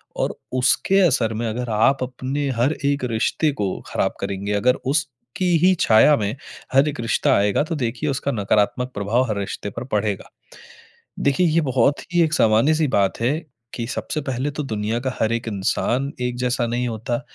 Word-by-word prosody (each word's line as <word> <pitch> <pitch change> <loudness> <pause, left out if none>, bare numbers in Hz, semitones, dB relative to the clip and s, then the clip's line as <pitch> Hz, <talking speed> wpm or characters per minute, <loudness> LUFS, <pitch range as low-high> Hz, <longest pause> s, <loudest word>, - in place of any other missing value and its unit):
और - - -1 0.3
उसके 190 +9 +3
असर 125 - +2
में 115 +1 -2
अगर 120 +2 -3
आप 130 +5 +2
अपने 130 +3 -3
हर 140 +5 +3
एक 140 -1 +1
रिश्ते 150 +7 +1
को 100 - +1 0.2
ख़राब - - -1
करेंगे, 100 +1 -3
अगर 125 +5 +3 0.2
उसकी 145 +4 -1
ही 190 - +5
छाया 115 +7 +6
में 105 +3 -2 0.4
हर 135 +3 +5
एक 145 - -7
रिश्ता 115 - +1
आएगा 100 +5 +2
तो 165 +2 -4
देखिए 130 +2 -2
उसका 140 +1 -1
नकारात्मक 105 +3 0
प्रभाव 115 +5 0
हर 105 - -1
रिश्ते 100 +1 -4
पर - - -3
पड़ेगा। 105 -2 -1 0.9
देखिए 140 +6 +2
ये 165 +1 +2
बहुत 130 +3 +2
ही 175 - +4
एक 160 - 0
सामान्य 115 +2 +4
सी 155 -1 +1
बात 100 -1 +1
है 135 +7 +1 0.4
कि 115 - -3
सबसे 155 +4 -3
पहले 130 0 -2
तो 150 - -4
दुनिया 110 -2 -2
का 130 0 -2
हर 110 - +1
एक 115 0 -3
इंसान 120 +6 -1
एक 125 0 -1
जैसा 125 0 0
नहीं 120 +1 -1
होता। 120 +2 -3
125 Hz, 185 wpm, -22 LUFS, 110-140 Hz, 0.9 s, छाया